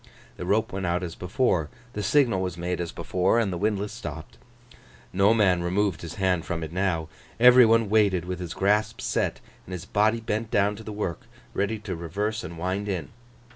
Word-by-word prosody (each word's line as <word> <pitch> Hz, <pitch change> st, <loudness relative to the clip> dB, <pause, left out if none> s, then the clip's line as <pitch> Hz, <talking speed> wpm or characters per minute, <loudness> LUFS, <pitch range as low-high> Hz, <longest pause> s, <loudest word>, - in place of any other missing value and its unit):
The 90 Hz, -, -5 dB
rope 105 Hz, +1 st, +1 dB
went 95 Hz, -1 st, -2 dB
out 85 Hz, +1 st, 0 dB
as 85 Hz, -2 st, -4 dB
before, 90 Hz, -, 0 dB, 0.2 s
the 105 Hz, -, -3 dB
signal 115 Hz, -2 st, +3 dB
was 90 Hz, -1 st, -3 dB
made 90 Hz, 0 st, -2 dB
as 85 Hz, -, -4 dB
before, 90 Hz, +4 st, +1 dB
and 110 Hz, -5 st, +1 dB
the -, -, -2 dB
windlass 105 Hz, 0 st, 0 dB
stopped. 80 Hz, -1 st, -8 dB, 0.7 s
No 100 Hz, +3 st, +4 dB
man 95 Hz, -6 st, +3 dB
removed 95 Hz, 0 st, 0 dB
his 85 Hz, -2 st, -7 dB
hand 95 Hz, -4 st, +1 dB
from 85 Hz, -1 st, -3 dB
it 80 Hz, +1 st, -6 dB
now. 90 Hz, -4 st, 0 dB, 0.3 s
Every 125 Hz, 0 st, +8 dB
one 115 Hz, 0 st, +4 dB
waited 100 Hz, -5 st, +3 dB
with 90 Hz, -1 st, -4 dB
his 90 Hz, -2 st, -5 dB
grasp 105 Hz, +3 st, +1 dB
set, -, -, -1 dB, 0.3 s
and 95 Hz, -, -7 dB
his 90 Hz, 0 st, -6 dB
body 110 Hz, +3 st, +2 dB
bent 110 Hz, 0 st, -3 dB
down 105 Hz, 0 st, +2 dB
to 110 Hz, -, -9 dB
the 110 Hz, -, -7 dB
work, 105 Hz, -6 st, -4 dB, 0.3 s
ready 105 Hz, +3 st, 0 dB
to 105 Hz, -3 st, -5 dB
reverse 105 Hz, +7 st, -3 dB
and 85 Hz, +1 st, -7 dB
wind 95 Hz, +4 st, -2 dB
in. 90 Hz, -4 st, -3 dB
95 Hz, 200 wpm, -26 LUFS, 90-105 Hz, 0.7 s, Every